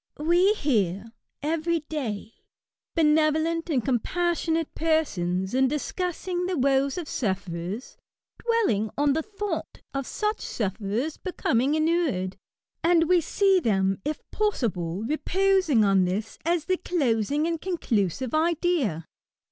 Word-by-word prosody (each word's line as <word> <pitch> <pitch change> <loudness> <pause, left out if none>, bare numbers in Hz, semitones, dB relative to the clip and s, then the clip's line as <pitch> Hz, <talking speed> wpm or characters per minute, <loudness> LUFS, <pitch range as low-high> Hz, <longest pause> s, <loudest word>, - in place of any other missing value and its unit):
We 350 +7 +3
hear, 215 - 0 0.3
every 330 +2 0
day, 235 -9 -4 0.6
benevolent 315 +1 +2
and 260 -8 0
compas 340 +8 0
sionate 325 -1 -1
persons, 190 - 0
in 265 +1 +4
discussing 355 +5 -2
the 365 -2 -1
woes 270 +1 +2
of 350 - -3
sufferers^ 190 - -3 0.5
dwelling 425 - +1
on 290 -1 +3
the 320 - 0
thought 415 +3 -5
of 275 -2 -3
such 425 0 -2
sufferers 215 - -2
becoming 275 -6 0
inured; 310 - +1 0.5
and 335 -1 +4
we 360 0 +4
see 385 +3 +3
them, 195 - +1
if 300 +1 -2
possible, 205 - -1
reposing 335 - +2
on 195 -2 +4
this 200 +5 -3
as 335 -1 +1
the 370 -1 +1
closing 285 - 0
and 330 -1 -2
conclusive 250 - -1
idea. 315 - +1
300 Hz, 120 wpm, -26 LUFS, 215-340 Hz, 0.6 s, in